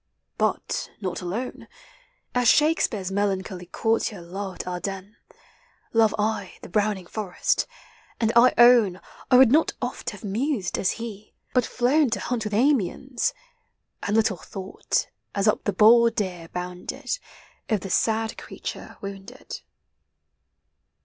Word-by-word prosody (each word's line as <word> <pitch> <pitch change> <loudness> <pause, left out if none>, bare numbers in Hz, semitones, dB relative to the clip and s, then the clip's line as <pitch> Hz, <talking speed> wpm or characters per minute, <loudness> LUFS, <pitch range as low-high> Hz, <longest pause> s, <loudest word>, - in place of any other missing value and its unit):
But - - -1
not 185 -3 -3
alone, 205 +9 -4 0.7
As 245 -1 +2
Shakespeare's 230 - +3
melancholy 190 -2 -2
courtier 225 +1 0
loved 185 +2 -6
Ardennes, 190 +3 -5 0.8
Love 225 -2 +4
I 210 -3 -1
the - - -9
browning 205 -1 0
forest; 195 -1 -1 0.5
and 225 -1 +2
I 240 +2 +7
own 235 -6 +6 0.3
I 250 - +7
would 255 -2 +7
not 315 +4 +4
oft - - -3
have - - -10
mused, 215 -1 -1
as 185 - +1
he, 215 -3 -8 0.2
but 250 -2 +2
flown 265 +3 +2
To 230 - -1
hunt 240 -3 -2
with 210 - -3
Amiens 255 0 +1 0.3
— - - -52
And 205 - -1
little 215 -4 +2
thought, 190 +3 -3 0.3
as 200 +1 +1
up 210 - +2
the 205 - +2
bold 230 +3 +6
deer 180 -6 -3
bounded, 180 - -5 0.5
Of 215 -4 +1
the 195 - -6
sad 225 0 +1
creature - - -7
wounded. 200 +6 -8
215 Hz, 130 wpm, -25 LUFS, 190-240 Hz, 0.8 s, I